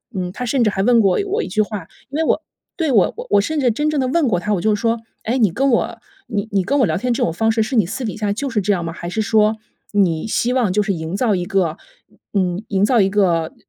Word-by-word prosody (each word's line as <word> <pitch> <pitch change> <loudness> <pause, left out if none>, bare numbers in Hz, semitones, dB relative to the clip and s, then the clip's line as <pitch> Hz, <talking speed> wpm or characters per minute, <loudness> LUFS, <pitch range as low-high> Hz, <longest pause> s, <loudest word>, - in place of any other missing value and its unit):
嗯， 180 -1 -3
他 250 - -4
甚 250 +1 +1
至 215 - +3
还 195 - -1
问 240 +1 +4
过 195 -3 +2
我 420 +3 -1
一 - - -5
句 215 - +1
话， 205 -5 -4 0.2
因 280 - -4
为 320 - +1
我 320 - +1 0.4
对， 320 -4 0
我 210 -7 +3
我 - - -7
我 205 -1 +5
甚 310 +9 -2
至 260 -3 +3
真 295 +7 0
正 300 - 0
地 260 - +1
问 295 +2 +2
过 185 -7 +1
他， 210 +4 -1
我 175 - -2
就 215 +2 +2
说： 230 +2 0 0.2
“哎， 235 +4 0
你 215 -7 +3
跟 275 +10 +1
我 235 - 0 0.3
你 210 -2 -2
你 195 -2 +1
跟 285 +9 0
我 260 - +5
聊 - - 0
天 245 +6 0
这 - - 0
种 - - +1
方 225 +5 +1
式， 225 0 +1
是 235 +5 -3
你 215 -6 +4
私 225 +9 -5
底 215 - -4
下 210 -2 -1
就 275 +6 -3
是 230 -4 0
这 205 +2 +1
样 175 -3 -2
吗？ 165 - -4
还 170 - -7
是 220 +5 -1
说， 215 0 +2 0.4
你 180 -6 +2
希 240 +2 0
望 240 -8 +1
就 210 - +2
是 200 -1 -1
营 160 +1 -4
造 215 -1 +1
一 180 -1 -2
个， 180 -4 0 0.6
嗯， 185 -1 0
营 195 -1 +1
造 240 +2 +3
一 195 - +3
个 175 -5 +1
210 Hz, 305 characters per minute, -19 LUFS, 190-245 Hz, 0.6 s, 我